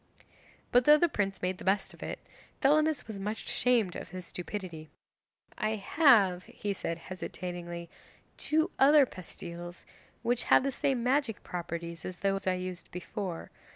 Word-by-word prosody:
'But 245 0 +5
though 300 0 +8
the 345 - +4
prince 195 - -2
made 180 0 -1
the - - -8
best 195 +1 +1
of - - -16
it, - - -4 0.4
Thelamis 305 +2 +3
was 215 -3 -7
much 210 +2 -4
ashamed 230 -8 +2
of - - -6
his 185 0 -7
stupidity. 175 -4 -6 0.7
"I 215 0 +1
have," 200 - +4
he 205 -1 -4
said 170 -3 -3
hesitatingly, 175 -1 -6 0.5
"two 315 +4 +1
other 285 +1 +7
pastilles 175 -3 -9 0.4
which 240 0 +1
have - - +6
the 275 - 0
same 260 -2 0
magic 255 -3 +1
properties 170 -1 -5
as 185 - -6
those 195 0 -1
I 185 - +3
used 180 -1 -6
before. 180 0 -5
195 Hz, 155 wpm, -30 LUFS, 180-250 Hz, 0.7 s, though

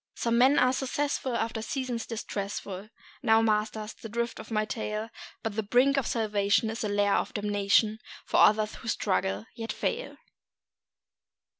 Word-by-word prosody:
Some 235 0 +1
men 265 +4 +6
are 255 0 +4
successful 265 -1 -1
after 225 0 -2
seasons 245 -1 -3
distressful 200 -2 -5 0.3
[Now, 225 -1 +4
masters, 215 0 0
the 225 - -10
drift 235 +2 -2
of - - -9
my 215 -1 0
tale]; 215 0 -4 0.3
But 225 -2 -3
the 220 - +1
brink 250 +6 +3
of 275 -4 0
salvation 210 -1 +1
is 225 - -4
a 210 - -1
lair 205 0 +2
of - - -3
damnation 205 +1 +2 0.3
For - - 0
others 215 0 +5
who 230 - -11
struggle, 110 - 0
yet 225 -1 -5
fail. - - -3
220 Hz, 155 wpm, -28 LUFS, 210-235 Hz, 0.3 s, men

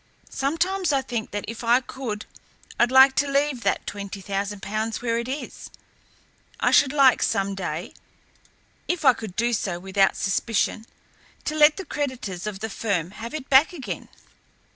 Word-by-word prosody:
Sometimes 335 +5 0
I 275 -2 +1
think 235 -4 -4
that 205 0 -4
if 230 +1 -6
I 235 +2 +4
could 250 -5 -6 0.5
I'd 240 - +4
like 265 +1 +8
to 285 0 +2
leave 280 -2 +1
that - - 0
twenty 200 -1 -6
thousand 195 +1 -4
pounds 220 +2 -2
where 230 -1 0
it 235 - -4
is. 275 +3 -6 0.9
I - - +2
should 280 -3 +5
like 275 -4 +5
some 195 0 0
day, 175 -3 -5 0.9
if 350 -3 -2
I 260 - +8
could 220 -5 -8
do 235 +3 +1
so 190 -5 -1
without 195 +2 +1
suspicion, 215 +2 -1 0.6
to 305 - -1
let 300 0 +5
the 385 - -6
creditors 245 - -4
of 200 -2 -5
the 220 - -3
firm 190 -5 -2
have 230 +6 -7
it 285 -3 -6
back 275 +6 +5
again. 230 - -6
230 Hz, 165 wpm, -24 LUFS, 200-275 Hz, 0.9 s, like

